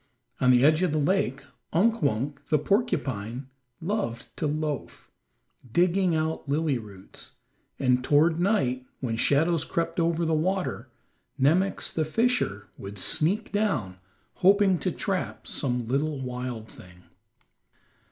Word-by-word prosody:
On 125 Hz, -, +3 dB
the 125 Hz, +1 st, +6 dB
edge 155 Hz, +2 st, +4 dB
of 180 Hz, -5 st, +1 dB
the -, -, +1 dB
lake 145 Hz, -3 st, 0 dB, 0.3 s
Unk 225 Hz, +7 st, +3 dB
Wunk, 140 Hz, +1 st, -1 dB
the 155 Hz, -, +3 dB
porcupine, 135 Hz, -, -1 dB, 0.3 s
loved 170 Hz, -, -3 dB
to 155 Hz, -, -1 dB
loaf, 150 Hz, -2 st, -4 dB, 0.6 s
digging 180 Hz, -, +2 dB
out 160 Hz, -2 st, -2 dB
lily 145 Hz, -3 st, +1 dB
roots, 100 Hz, -4 st, -12 dB, 0.4 s
and 125 Hz, -1 st, +2 dB
toward 155 Hz, +4 st, +3 dB
night, 175 Hz, -, +1 dB, 0.2 s
when 120 Hz, -4 st, -2 dB
shadows 155 Hz, +6 st, +2 dB
crept 170 Hz, +2 st, -2 dB
over 170 Hz, 0 st, +1 dB
the 160 Hz, -, +1 dB
water, 160 Hz, -6 st, -1 dB, 0.5 s
Nemox, 175 Hz, +9 st, +2 dB
the 160 Hz, -, +1 dB
fisher, 155 Hz, -, 0 dB
would 100 Hz, +1 st, -8 dB
sneak 165 Hz, -, +1 dB
down, 135 Hz, -, -1 dB, 0.4 s
hoping 195 Hz, -1 st, +4 dB
to 185 Hz, -, -1 dB
trap 185 Hz, +1 st, -3 dB
some 125 Hz, -4 st, -1 dB
little 140 Hz, +4 st, -1 dB
wild 125 Hz, -3 st, -5 dB
thing. 90 Hz, -3 st, -15 dB
150 Hz, 130 wpm, -26 LUFS, 125-175 Hz, 0.6 s, the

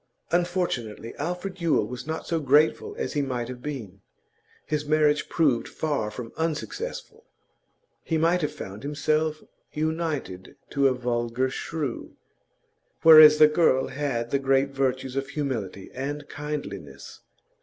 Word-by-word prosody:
Unfortunately, 175 Hz, -, -1 dB
Alfred 180 Hz, +4 st, -4 dB
Yule 165 Hz, -2 st, +2 dB
was 125 Hz, +2 st, -7 dB
not 160 Hz, 0 st, -4 dB
so 165 Hz, -, -1 dB
grateful 155 Hz, -, +2 dB
as 475 Hz, -, -3 dB
he 145 Hz, -, +1 dB
might 125 Hz, -4 st, -2 dB
have 125 Hz, -1 st, -8 dB
been. 115 Hz, -10 st, -6 dB, 0.6 s
His 150 Hz, -1 st, -1 dB
marriage 150 Hz, 0 st, +2 dB
proved 140 Hz, -8 st, +2 dB
far 145 Hz, -9 st, -2 dB
from 115 Hz, +2 st, -8 dB
unsuccessful; 415 Hz, -, -4 dB, 0.8 s
he 165 Hz, -, 0 dB
might 170 Hz, +3 st, +2 dB
have 150 Hz, -1 st, -1 dB
found 105 Hz, -9 st, -8 dB
himself 155 Hz, +2 st, -1 dB, 0.3 s
united 155 Hz, -, -3 dB, 0.2 s
to 140 Hz, -1 st, +3 dB
a 130 Hz, -, +2 dB
vulgar 120 Hz, +1 st, -1 dB
shrew, 150 Hz, -3 st, -4 dB, 0.9 s
whereas 155 Hz, -1 st, +10 dB
the 155 Hz, -, +8 dB
girl 150 Hz, -4 st, +3 dB
had 130 Hz, -5 st, -2 dB
the 140 Hz, -, +2 dB
great 135 Hz, 0 st, +2 dB
virtues 130 Hz, -1 st, -1 dB
of 135 Hz, 0 st, -2 dB
humility 115 Hz, -11 st, -4 dB
and 145 Hz, +2 st, -4 dB
kindliness. 100 Hz, -, -7 dB
145 Hz, 135 wpm, -26 LUFS, 125-155 Hz, 0.9 s, whereas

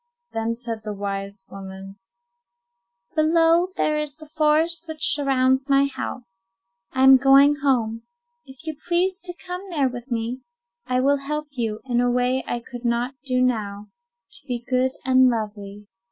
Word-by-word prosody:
Then 225 Hz, +1 st, -2 dB
said 230 Hz, -2 st, -5 dB
the 210 Hz, -1 st, -5 dB
wise 195 Hz, 0 st, -5 dB
woman:— 195 Hz, 0 st, -9 dB, 1.1 s
"Below 330 Hz, +3 st, +3 dB
there 305 Hz, 0 st, +1 dB
is 300 Hz, -2 st, -4 dB
the 310 Hz, 0 st, -13 dB
forest 315 Hz, +2 st, +1 dB
which 315 Hz, 0 st, +1 dB
surrounds 265 Hz, -1 st, +2 dB
my 275 Hz, 0 st, +5 dB
house. 235 Hz, -7 st, -6 dB, 0.5 s
I 260 Hz, -, +1 dB
am 265 Hz, 0 st, +9 dB
going 275 Hz, +2 st, +6 dB
home. 235 Hz, -6 st, 0 dB, 0.4 s
If 265 Hz, +3 st, -10 dB
you 315 Hz, -2 st, -4 dB
pledge 360 Hz, +2 st, +1 dB
to 355 Hz, -, -1 dB
come 360 Hz, 0 st, -5 dB
there 290 Hz, -7 st, +1 dB
to 245 Hz, -1 st, -6 dB
me, 235 Hz, +2 st, -2 dB, 0.5 s
I 255 Hz, 0 st, +1 dB
will 280 Hz, +2 st, +3 dB
help 300 Hz, +2 st, -4 dB
you, 225 Hz, -5 st, -3 dB
in 245 Hz, -2 st, +1 dB
a 245 Hz, -, +2 dB
way 250 Hz, +1 st, +1 dB
I 240 Hz, -, -2 dB
could 245 Hz, 0 st, -10 dB
not 240 Hz, +2 st, 0 dB
do 255 Hz, -1 st, +1 dB
now, 210 Hz, -4 st, -2 dB, 0.4 s
to -, -, -9 dB
be 240 Hz, -2 st, -4 dB
good 255 Hz, 0 st, +1 dB
and 260 Hz, -1 st, +5 dB
lovely. 210 Hz, -3 st, -5 dB
255 Hz, 160 wpm, -23 LUFS, 230-295 Hz, 1.1 s, am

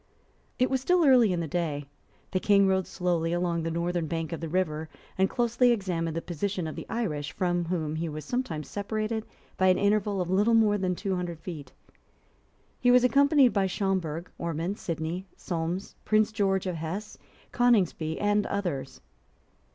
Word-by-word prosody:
It 255 Hz, 0 st, +2 dB
was 265 Hz, -1 st, +1 dB
still 355 Hz, +4 st, +3 dB
early 250 Hz, -7 st, +6 dB
in 175 Hz, -1 st, 0 dB
the 165 Hz, -, -3 dB
day. 150 Hz, -3 st, -2 dB, 0.5 s
The 185 Hz, -, +1 dB
King 200 Hz, 0 st, +4 dB
rode 190 Hz, -1 st, +1 dB
slowly 170 Hz, -2 st, -1 dB
along 175 Hz, -1 st, 0 dB
the 165 Hz, -, -2 dB
northern 170 Hz, 0 st, -1 dB
bank 165 Hz, +1 st, -3 dB
of 165 Hz, -, -4 dB
the 165 Hz, -, -4 dB
river, 160 Hz, -3 st, -1 dB, 0.3 s
and 190 Hz, 0 st, +2 dB
closely 240 Hz, 0 st, +2 dB
examined 175 Hz, -7 st, -1 dB
the 165 Hz, -, -3 dB
position 180 Hz, +2 st, -3 dB
of 155 Hz, -, -5 dB
the -, -, -7 dB
Irish, 160 Hz, -10 st, -2 dB
from 175 Hz, -1 st, 0 dB
whom 160 Hz, -3 st, -2 dB
he 165 Hz, +1 st, -2 dB
was 155 Hz, -1 st, -6 dB
sometimes 165 Hz, -, -3 dB
separated 215 Hz, +2 st, -3 dB, 0.3 s
by 185 Hz, -, +3 dB
an 185 Hz, -, +5 dB
interval 205 Hz, -1 st, +1 dB
of 180 Hz, 0 st, -2 dB
little 210 Hz, +5 st, +4 dB
more 210 Hz, -2 st, +4 dB
than 185 Hz, -1 st, 0 dB
two 195 Hz, +1 st, -2 dB
hundred 175 Hz, -2 st, -4 dB
feet. 155 Hz, -6 st, -8 dB, 1.1 s
He 245 Hz, -, +3 dB
was 250 Hz, 0 st, +6 dB
accompanied 280 Hz, 0 st, +5 dB
by 195 Hz, -2 st, +2 dB
Schomberg, 180 Hz, -4 st, -2 dB
Ormond, 170 Hz, +4 st, -3 dB
Sidney, 165 Hz, +3 st, -4 dB
Solmes, 175 Hz, +2 st, -3 dB
Prince 215 Hz, 0 st, +3 dB
George 195 Hz, -3 st, +1 dB
of 180 Hz, -3 st, -2 dB
Hesse, 180 Hz, +7 st, -5 dB, 0.3 s
Coningsby, 190 Hz, -10 st, +2 dB
and 205 Hz, 0 st, +2 dB
others. 140 Hz, -10 st, -3 dB
185 Hz, 175 wpm, -28 LUFS, 165-210 Hz, 1.1 s, early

